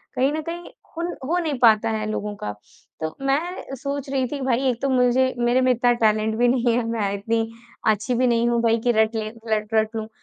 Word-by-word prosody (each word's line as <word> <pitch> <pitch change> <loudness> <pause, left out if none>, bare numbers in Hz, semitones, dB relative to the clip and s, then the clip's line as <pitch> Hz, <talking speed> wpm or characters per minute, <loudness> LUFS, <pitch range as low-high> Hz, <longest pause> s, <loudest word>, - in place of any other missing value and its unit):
कहीं 265 +3 +2
न 315 - -2
कहीं 340 +2 -7 0.3
हुन 340 +1 -1 0.2
हो 340 +6 0
नहीं 305 -6 -2
पाता 225 -1 +5
है 215 -1 -2
लोगों 210 -1 -3
का। 105 - -2 0.5
तो 160 0 -3
मैं 275 +2 +3 0.2
अ, 270 - -7
सोच 280 +1 -4
रही 265 -2 0
थी 280 0 -5
भई 260 0 +1
एक 240 -1 -3
तो 275 - 0
मुझे 255 0 +3
मेरे 240 +2 +3
में 255 0 +4
इतना 245 0 +3
टैलेंट 220 -1 +1
भी 245 - +3
नहीं 240 -1 +2
है, 245 - 0
मैं 210 -4 -1
इतनी 225 +2 -1 0.4
अच्छी 220 +4 -1
भी 255 +1 +2
नहीं 235 0 +2
हूँ 235 -1 +1
भाई 230 0 +3
की - - +6
रटले 220 0 +1 0.3
रट 215 +1 -5
रट 220 0 +1
लूँ 220 0 -4
240 Hz, 230 wpm, -23 LUFS, 220-260 Hz, 0.5 s, की